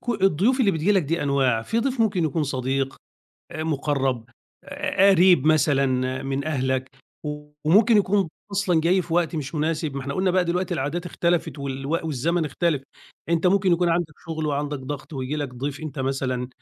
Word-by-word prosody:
ك - - -17
الضيوف 195 - +3
اللي 205 -5 +4
بتيجي 165 +5 +1
لك 190 -4 +3
دي 165 +3 -1
أنواع: 135 -5 +2
في 225 - -1
ضيف 255 0 -1
ممكن 195 -7 +2
يكون 155 +1 0
صديق، 135 0 -2 0.5
آآ، 155 0 -4
مقرب، 135 -5 -1 0.4
ق - - -15
ق 290 -3 -4
قريب 180 -5 +5
مثلًا 135 -4 +2
من 135 +1 -2
أهلك. 130 -3 -1 0.8
وممكن 210 +6 +5
يكون 195 -2 +2 0.2
أصلًا 185 -5 +2
جاي 180 +3 +2
في 165 - -4
وقت 170 -2 +1
مش 150 +1 -4
مناسب، 155 -1 -1
ما - - -2
إحنا 140 +1 -4
قلنا 185 0 +1
بقى 185 0 +2
دلوقتي 180 +1 -1
العادات 160 +6 -2
اختلفت 170 -3 -1
والو 135 +1 -4 0.2
والزمن 160 +4 0
اختلف، 150 -1 0 0.5
أنت 170 +1 +2
ممكن 190 -1 +3
يكون 175 +1 +2
عندك 165 -3 0
شغل 160 -1 -3
وعندك 145 0 -2
ضغط 145 +4 -7
وييجي 135 +2 -3
لك 140 -4 -4
ضيف 140 +4 -4
أنت 150 -3 -7
مثلًا 130 -2 -2
155 Hz, 180 wpm, -24 LUFS, 135-175 Hz, 0.8 s, قريب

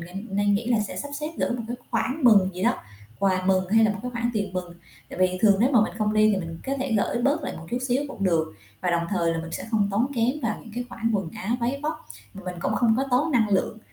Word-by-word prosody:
ng 195 +5 -7
nên 205 0 +3
nghĩ 230 +3 -1
là 235 -3 +3
sẽ 210 - -4
sắp 285 - -4
xếp 300 - -2
gửi - - 0
một 240 -1 -2
cái 245 - -3
khoản 255 +5 0
mừng 200 -5 +6
gì 185 - -5
đó, - - +3 0.4
quà 185 -2 +1
mừng 185 -1 +2
hay 225 0 +5
là 210 - +3
một 200 - -7
cái 250 - -4
khoản 240 0 -1
tiền 200 -3 -2
mừng. 180 -2 -5 0.3
Tại - - -9
vì 185 0 +2
thường 205 -3 +5
nếu 255 +4 +4
mà 235 - +6
mình - - -2
không 210 0 +1
đi, 215 0 +5
thì - - +1
mình 165 -3 -5
có 270 - -1
thể 265 -3 -2
gửi 240 +3 0
bớt 290 +3 +2
lại - - -4
một 165 - -10
chút 245 - 0
xíu 260 +4 +2
cũng 200 -7 -4
được, 160 - +1 0.3
và 180 - 0
đồng 170 0 +1
thời 170 -4 +1
là 165 - -2
mình 165 0 -6
sẽ - - -4
không 210 -3 +2
tốn 220 +6 +2
kém 235 0 +2
vào 220 -2 -1
những 225 - -13
cái 245 0 -3
khoản 230 -1 -2
quần 195 -5 -1
áo 220 +2 -2
váy 260 +4 -1
vóc. 310 +1 -4 0.3
Mà 195 - -9
mình 180 -1 -4
cũng - - 0
không 230 -2 +3
có 270 - +1
tốn 290 +5 +2
năng 225 -4 +3
lượng, 200 +2 +1
215 Hz, 295 wpm, -25 LUFS, 185-240 Hz, 0.4 s, mừng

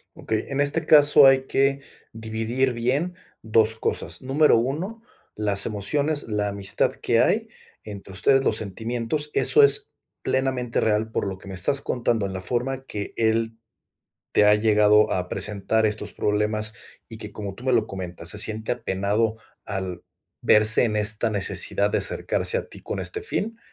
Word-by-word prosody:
Okey, 110 0 -2
en 140 +1 0
este 145 +3 0
caso 150 -2 +7
hay 135 0 +5
que 135 +1 +1 0.3
dividir 115 +4 -1
bien 135 +10 -1 0.3
2 110 0 +3
cosas. - - -3
Número 135 +1 +4
1 170 - -3 0.3
las 100 -2 0
emociones, 145 +8 -1
la 105 -1 -1
amistad 100 -1 -1
que - - +1
hay - - +2 0.3
entre 100 -2 -9
ustedes, 135 +8 +3
los 110 - +2
sentimientos, 115 +8 -3
eso 440 - +5
es 425 0 +2 0.3
plenamente 130 -2 0
real 110 0 +1
por - - -1
lo 95 -1 -5
que 95 - -15
me 95 - -7
estás 140 +10 +1
contando 120 -4 -1
en 95 - -4
la 95 - -4
forma 130 +6 -2
que 105 -5 -5
él, 115 0 +1 0.8
te - - +4
ha 105 0 +6
llegado 105 0 +4
a 90 -1 -2
presentar 105 +2 -1
estos 105 +1 -3
problemas 105 +1 -1 0.3
y 115 - -9
que, 105 -1 -8
como 100 -2 -6
tú 120 +6 -13
me 130 - +1
lo 115 -3 +2
comentas, 90 -3 -7
se 105 - -4
siente 110 +1 -3
apenado, 110 0 -1 0.3
al 95 -3 -4 0.4
verse 110 +2 +4
en 110 - -1
esta 110 +2 0
necesidad 100 0 -1
de - - +1
acercarse - - -2
a - - -7
ti - - -12
con - - -4
este 430 - -3
fin. 225 - -3
110 Hz, 165 wpm, -24 LUFS, 105-135 Hz, 0.8 s, caso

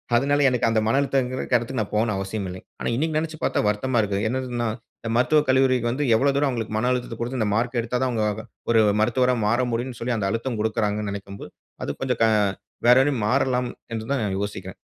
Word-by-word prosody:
அதனால 145 +4 +3
எனக்கு 125 -2 +1
அந்த 115 -1 +2
மன 130 +5 +3
அழுத்தம்ங்கற 130 -2 0
இடத்துக்கு 125 +1 0
நான் 105 - -5
போணும்னு 105 -1 +1
அவசியமில்ல. 95 -1 -4 0.2
ஆனா - - -2
இன்னிக்கு 155 +4 0
நெனச்சுப் 155 0 -4
பார்த்தா - - +1
வருத்தமா 120 +4 0
இருக்கு. 100 -1 -1
என்னதுன்னா 125 -2 -2 0.3
இந்த 115 - -5
மருத்துவக் 150 +5 +3
கல்லூரிக்கு 130 -2 +3
வந்து 140 +5 -1
எவ்ளோ 140 +4 +3
தூரம் 145 0 +2
அவங்களுக்கு 115 -4 -3
மன 125 +3 +1
அழுத்தத்த 125 -2 -2
குடுத்து 125 +2 -3
இந்த 105 - +1
மார்க் 120 +2 0
எடுத்தாதான் 125 +3 -1
அவங்க 110 -3 0 0.2
வ 110 - -9 0.3
ஒரு 115 -1 +5 0.2
மருத்துவரா 125 +3 +2
மாற 120 +4 +2
முடியும்னு 120 +1 -3
சொல்லி 120 +1 0
அந்த 100 -3 -1
அழுத்தம் 115 +1 -2
குடுக்றாங்கன்னு 105 -1 -1
நெனைக்கும்போது, 100 0 -8 0.3
அது - - -4
கொஞ்சம் 125 -3 -1
க - - +7 0.6
வேற 125 +1 +8
ரி - - 0
மாறலாம் 125 +2 +1 0.2
என்றுதான் 115 +3 -2 0.2
யோசிக்கிறேன். 100 0 -5
120 Hz, 195 wpm, -24 LUFS, 110-130 Hz, 0.6 s, வேற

